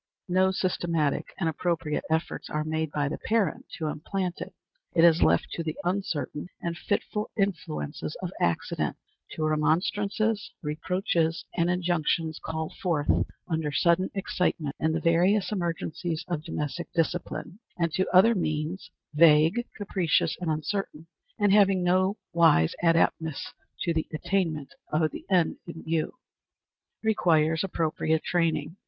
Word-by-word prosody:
No 185 +1 +4
systematic 170 -5 0
and 170 - +1
appropriate 160 -1 -1
efforts 160 +1 -1
are 150 0 -1
made 160 0 -1
by 145 -1 0
the 145 - -4
parent 215 -7 0
to 160 - -3
implant 175 +4 -3
it. - - -6 0.4
It 165 - +5
is 170 -1 +6
left - - +3
to 165 - -3
the 155 -1 -4
uncertain 175 -4 -2
and 170 0 -3
fitful 210 +3 -2
influences 160 -6 -2
of 180 - -3
accident 85 -1 0 0.4
to 155 - -3
remonstrances, 200 +7 +1
reproaches, 165 +1 0
and 170 0 +2
injunctions 170 -3 0
called 160 0 -4
forth 160 -6 +1 0.4
under 160 -3 -1
sudden 170 +4 +3
excitement 170 -6 -1
in 160 - +1
the 165 - 0
various 180 +6 +3
emergencies 170 -3 -2
of 170 -4 -2
domestic 160 0 -4
discipline, 175 +3 -2 0.2
and 170 -2 0
to 185 +3 +1
other 190 +6 +7
means, 155 -1 -2 0.2
vague, 160 +8 +5
capricious, 190 -5 +1
and 175 - -1
uncertain, 160 +1 -2 0.3
and 205 -2 +3
having 195 -3 +5
no 185 +3 +2 0.2
wise 165 - +5
adaptedness 165 -2 +1 0.3
to 170 - +1
the 160 -1 -1
attainment 160 -3 -1 0.2
of 155 0 +2
the - - -9
end 180 -4 +2
in 165 -1 -8
view. 160 +7 -1 0.9
Requires 160 -7 +3
appropriate 160 -3 0
Training. 165 -1 0
170 Hz, 135 wpm, -27 LUFS, 155-185 Hz, 0.9 s, other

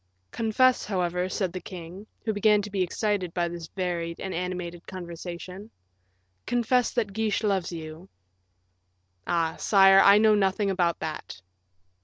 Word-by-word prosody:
"Confess, 245 +3 +2
however," 180 -2 -1
said 185 -2 -2
the 185 - -4
king, 180 +3 -9 0.2
who 220 - 0
began 210 0 +3
to 210 - -7
be 195 -1 -1
excited 185 -1 -1
by 175 -1 +1
this 170 -1 -7
varied 170 -2 -3
and 190 - -5
animated 180 -1 -5
conversation; 180 +2 -8 0.8
"confess 245 0 +2
that 220 -5 -1
Guiche 220 0 -1
loves 195 -4 0
you." 160 +2 -8 1.2
"Ah! 165 -1 0
sire, 195 -1 +6
I 200 +1 +7
know 215 0 +5
nothing 195 0 +1
about 175 -3 +1
that." 155 -10 -6
185 Hz, 140 wpm, -26 LUFS, 175-210 Hz, 1.2 s, I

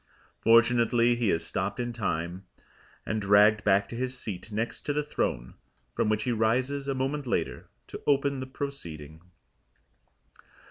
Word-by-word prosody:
Fortunately 115 +1 +4
he 120 -3 0
is 80 - 0
stopped - - -3
in 120 -1 -2
time, 90 -3 -3 0.6
and 110 -1 -2
dragged 105 +1 +5
back 100 0 +3
to - - -7
his 130 +1 -3
seat 105 -3 -6
next 110 +3 -3
to 145 - +1
the 150 +1 0
throne, 60 - -2 0.4
from - - 0
which 110 0 +1
he 125 - 0
rises 130 +5 0
a 135 - -1
moment 135 +1 -2
later - - -2 0.2
to - - -9
open 140 -1 +2
the 130 - -5
proceeding. 85 - -7
115 Hz, 150 wpm, -28 LUFS, 100-130 Hz, 0.6 s, dragged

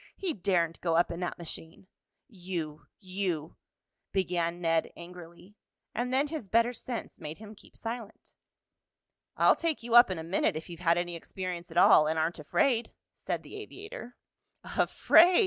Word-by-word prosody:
"He 375 -4 -2
daren't 175 -4 0
go 165 -2 +1
up 170 - +3
in 170 - -5
that 180 -1 -3
machine." 165 +1 -8 0.4
"You 175 -7 -6
you 185 -5 -3 0.3
" - - -57
began 175 -2 0
Ned 165 -2 +1
angrily, 175 +2 -12 0.4
and 245 +2 -2
then 275 +3 +2
his 305 -9 -5
better 230 +3 +3
sense 240 -2 -6
made 155 -2 -6
him 215 0 -10
keep 210 - -18
silent. 225 -2 -7 1.0
"I'll - - +6
take 325 -7 -2
you 235 0 -4
up 240 -2 +9
in 185 - -2
a 160 - -5
minute 170 -1 +1
if 160 +3 -6
you've 170 - -8
had 170 -1 +3
any 175 0 -2
experience 180 0 -5
at 165 - -7
all, 155 -3 +7
and 160 +1 0
aren't 160 +2 0
afraid," 225 - +1 0.3
said - - -3
the - - -11
aviator. 405 - -9 0.5
"Afraid!" 350 +2 +5
180 Hz, 165 wpm, -30 LUFS, 170-230 Hz, 1.0 s, up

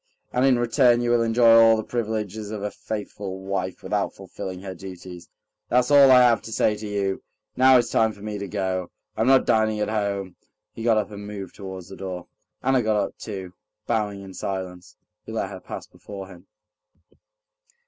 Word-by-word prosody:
And 125 - +2
in 130 -2 +4
return 120 0 +3
you 120 0 +1
will 120 -1 +4
enjoy 115 0 +5
all 115 0 +6
the 110 - -2
privileges 110 -3 -3
of 105 -1 -5
a 105 - -2
faithful 105 -3 -6
wife 95 -1 -4
without - - -1
fulfilling 95 -1 -7
her 95 -1 -5
duties. 90 -1 -10 0.4
That's 125 +2 +2
all 140 -1 +8
I 130 -1 +8
have 120 -2 +4
to 115 - -9
say 110 -1 +2
to 105 0 -6
you. 100 -2 -1 0.3
Now 130 0 +7
it's 120 - +1
time 110 0 +3
for 100 -1 -13
me 105 -1 -4
to 100 - -4
go. 95 -2 -2 0.3
I'm - - +1
not 135 0 +5
dining 110 -1 +2
at 105 - 0
home." 100 -3 -2 0.4
He - - -9
got 115 -1 +3
up 105 0 -1
and 100 0 -8
moved 100 -3 -7
towards 95 -2 -8
the 95 - -10
door. 90 -2 -6 0.4
Anna 130 -1 +3
got 110 -1 +1
up 105 - -2
too. 95 -4 -7 0.3
Bowing 105 -4 -1
in 95 -1 -10
silence, 95 -2 -5 0.3
he - - -9
let - - -2
her - - -7
pass - - -8
before 100 -2 -10
him. 90 0 -15
105 Hz, 195 wpm, -24 LUFS, 95-115 Hz, 0.4 s, all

